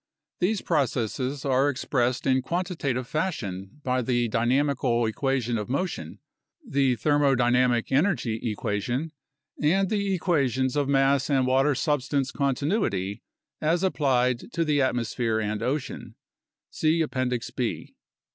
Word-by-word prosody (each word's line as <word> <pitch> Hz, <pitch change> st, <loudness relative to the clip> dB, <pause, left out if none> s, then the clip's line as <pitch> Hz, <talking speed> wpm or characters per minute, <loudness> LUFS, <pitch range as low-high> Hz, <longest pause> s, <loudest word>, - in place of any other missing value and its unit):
These 195 Hz, +3 st, +1 dB
processes 130 Hz, -, -1 dB
are 135 Hz, +1 st, +3 dB
expressed 125 Hz, -2 st, -1 dB
in 130 Hz, -1 st, +3 dB
quantitative 160 Hz, -5 st, -2 dB
fashion 110 Hz, -, -4 dB
by 130 Hz, 0 st, +1 dB
the 120 Hz, -1 st, +1 dB
dynamical 120 Hz, +1 st, +1 dB
equation 125 Hz, -1 st, -1 dB
of 105 Hz, -, -5 dB
motion, 175 Hz, +8 st, -3 dB, 0.5 s
the 135 Hz, -, +2 dB
thermo 145 Hz, +3 st, +2 dB
dynamic 120 Hz, -1 st, +2 dB
energy 135 Hz, -, +1 dB
equation, 120 Hz, +8 st, -2 dB, 0.5 s
and 185 Hz, +6 st, +2 dB
the 200 Hz, -2 st, +1 dB
equations 130 Hz, -7 st, +1 dB
of 145 Hz, -1 st, 0 dB
mass 135 Hz, 0 st, +3 dB
and 135 Hz, -3 st, +3 dB
water 135 Hz, +3 st, +3 dB
substance 140 Hz, -1 st, 0 dB
continuity, 135 Hz, -, -1 dB, 0.4 s
as 165 Hz, +4 st, +1 dB
applied 130 Hz, -, +1 dB
to 165 Hz, -1 st, 0 dB
the 150 Hz, -2 st, +2 dB
atmosphere 115 Hz, -3 st, 0 dB
and 105 Hz, -1 st, -2 dB
ocean 130 Hz, +4 st, -3 dB, 0.6 s
(see 160 Hz, +1 st, +1 dB
Appendix 130 Hz, -4 st, -2 dB
B). 120 Hz, -3 st, -3 dB
130 Hz, 120 wpm, -26 LUFS, 120-150 Hz, 0.6 s, are